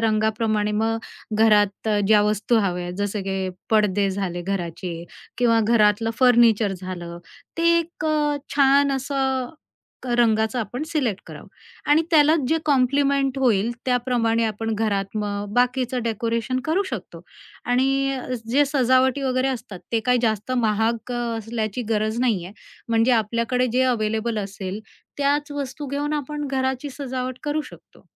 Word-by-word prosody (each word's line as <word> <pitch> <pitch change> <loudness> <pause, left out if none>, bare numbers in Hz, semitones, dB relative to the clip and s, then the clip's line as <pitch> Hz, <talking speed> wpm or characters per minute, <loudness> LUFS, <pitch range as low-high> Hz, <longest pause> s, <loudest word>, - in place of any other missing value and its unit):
रंगाप्रमाणे 215 -1 +1
मग 225 +2 0 0.4
घरात 210 -1 +3 0.2
ज्या 215 -1 +5
वस्तू 210 +3 +1
हव्या 180 -3 -1
आहेत, 175 - -5
जसं 205 0 -2
की 190 -1 -2 0.2
पडदे 205 -2 +2
झाले 185 -3 -3
घराचे 175 -2 -4 0.4
किंवा 230 -2 +3
घरातलं 220 0 +3
फर्निचर 235 -5 +4
झालं, 175 -2 -7 0.4
ते 335 0 +4
एक 335 -1 -5
अ, 300 -1 +1 0.2
छान 280 0 +4
असं 265 -1 -1 0.5
क - - -9
रंगाचं 220 0 +2
आपण 245 +5 -4
सिलेक्ट 265 - -1
करावं - - -10 0.4
आणि 310 +2 +5
त्यालाच 310 0 +5
जे 320 - +2
कॉम्प्लिमेंट 275 0 +2
होईल, 230 -4 +2 0.2
त्याप्रमाणे 240 -2 +1
आपण 225 0 -2
घरात 205 -1 -1
मग 205 -1 -3
बाकीचं 250 0 +1
डेकोरेशन 230 +3 -1
करू 340 +6 +1
शकतो. - - -7 0.4
आणि 270 +2 +1
अ, 255 - -6 0.2
जे 285 +4 +4
सजावटी 260 0 +2
वगैरे 260 0 +1
असतात, 225 -7 -5
ते 230 - +2
काय 250 0 +4
जास्त 220 +1 0
महाग 225 +3 0
अ, - - -2 0.2
असल्याची 225 +1 -3
गरज 215 +1 0
नाही 220 -9 +1
आहे. 190 +4 -10 0.3
म्हणजे 230 +2 +3
आपल्याकडे 235 +3 +1
जे 255 +1 +3
अवेलेबल 220 -2 0
असेल, 195 0 -5 0.4
त्याच 290 +1 +1
वस्तू 285 +1 -5
घेऊन 290 +2 -2
आपण 295 0 -3
घराची 265 +1 -2
सजावट 255 -2 -5
करू 300 +1 0
शकतो. - - -18
235 Hz, 145 wpm, -23 LUFS, 215-265 Hz, 0.5 s, ज्या